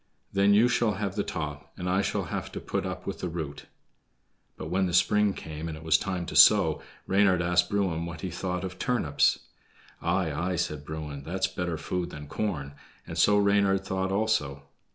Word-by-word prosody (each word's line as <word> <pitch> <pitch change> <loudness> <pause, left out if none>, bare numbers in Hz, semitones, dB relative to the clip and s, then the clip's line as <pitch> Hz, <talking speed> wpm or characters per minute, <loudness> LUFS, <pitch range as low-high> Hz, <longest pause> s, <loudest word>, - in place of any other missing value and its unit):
Then 100 +1 +4
you 115 +4 +6
shall 120 -3 +2
have 100 -1 -3
the 105 - 0
top, 75 -3 -5
and 90 - -4
I 95 +2 +2
shall - - -1
have - - -5
to - - -4
put - - -3
up - - -6
with - - -5
the 90 - -3
root." 80 -4 -6 0.9
But 80 - -6
when 95 +1 +2
the 85 - -1
spring 105 +1 +3
came, 80 +1 -6
and 80 -1 -5
it 80 - -11
was 80 -1 +3
time 90 -3 -1
to - - -7
sow, - - +6 0.2
Reynard 95 -2 +3
asked 90 +1 +2
Bruin 90 -5 0
what 85 -2 -7
he 95 - -4
thought 90 +1 -3
of 95 -1 -6
turnips. 100 - +2 0.6
"Aye, - - 0
aye!" 90 +2 -1
said 75 -4 -3
Bruin, 75 -2 -6
"that's 95 +6 -1
better 85 -2 -3
food 90 +2 -3
than 75 0 -8
corn"; 70 -4 -3 0.3
and - - -7
so 105 0 +4
Reynard 100 -1 +3
thought 95 0 -1
also. 95 -10 0
90 Hz, 195 wpm, -28 LUFS, 80-100 Hz, 0.9 s, you